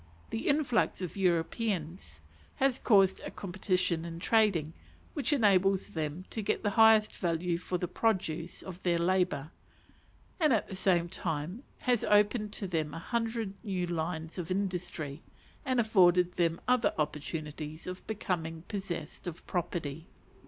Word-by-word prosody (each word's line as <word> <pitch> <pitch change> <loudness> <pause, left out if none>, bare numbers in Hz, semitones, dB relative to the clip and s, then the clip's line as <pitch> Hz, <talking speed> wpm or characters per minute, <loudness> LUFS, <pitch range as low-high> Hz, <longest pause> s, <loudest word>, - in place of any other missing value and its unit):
The 225 - -3
influx 285 -6 +2
of 180 - -5
Europeans 175 - -1 0.3
has 270 -1 +2
caused 195 -4 +4
a - - -6
competition 185 -3 -1
in 165 0 -6
trading, 195 -6 +2 0.4
which 290 0 -1
enables 195 -7 +3
them 160 +3 -4
to 220 - -3
get 200 - -1
the 205 - +1
highest 220 0 +6
value 170 -1 0
for 180 0 -2
the 180 - -2
produce 175 -7 -1
of 185 -1 -8
their 175 -2 +2
labour, 175 -3 +1 0.9
and 305 -6 +4
at 220 - +1
the - - -8
same 180 -2 +2
time 170 - -3 0.2
has 245 -3 +2
opened 210 +1 +3
to 195 - -4
them 155 -4 -2
a - - -4
hundred 225 +2 -2
new 190 -5 -1
lines 165 0 -3
of 170 - -4
industry, 180 -6 -3 0.4
and 260 -4 +1
afforded 180 -5 +4
them 170 -1 +1
other 250 -4 +3
opportunities 150 0 -4
of 180 0 -7
becoming 165 -6 -3
possessed 180 -7 -5
of 170 -2 -7
property. 165 -3 -3
180 Hz, 145 wpm, -31 LUFS, 165-210 Hz, 0.9 s, highest